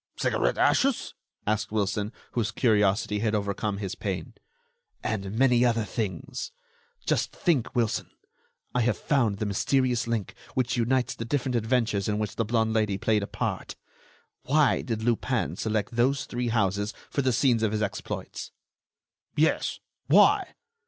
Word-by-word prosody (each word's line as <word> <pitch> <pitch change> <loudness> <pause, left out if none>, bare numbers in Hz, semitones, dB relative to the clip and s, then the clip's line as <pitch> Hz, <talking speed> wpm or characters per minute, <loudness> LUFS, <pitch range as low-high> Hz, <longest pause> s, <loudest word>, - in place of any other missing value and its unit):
"Cigarette - - +1
ashes?" 270 -2 +2 0.3
asked 105 0 0
Wilson, 105 0 0 0.2
whose 115 -4 0
curiosity 105 -3 +2
had 110 0 +1
overcome 100 0 -1
his 100 -2 -4
pain. 95 -5 -4 0.7
"And 100 -1 -2
many 125 -1 +4
other 115 -2 +2
things! 100 -4 -4 0.5
Just - - +1
think, 150 -10 +1
Wilson, 115 -3 0 0.6
I 125 - +2
have 120 +1 +1
found 120 -9 +1
the 110 - -2
mysterious 125 +4 +1
link 115 -4 -2 0.2
which 130 -1 +1
unites 125 +1 +1
the - - -5
different 130 +1 -1
adventures 110 -3 +1
in 105 -1 0
which 105 -1 -3
the 115 - +1
blonde 110 0 +1
Lady 105 -3 +1
played 105 +1 +2
a 100 - -3
part. - - -3 0.7
Why 150 +2 +3
did 115 -4 -3
Lupin 120 +1 0
select 110 -2 -1
those 130 +4 +1
three 120 0 -3
houses 105 -2 0 0.2
for 140 - +1
the 130 -1 +2
scenes 120 -2 +3
of 110 -2 +2
his 110 0 0
exploits?" 100 - -5 0.9
"Yes, 155 +1 +1 0.3
why?" - - +5
110 Hz, 145 wpm, -27 LUFS, 105-125 Hz, 0.9 s, why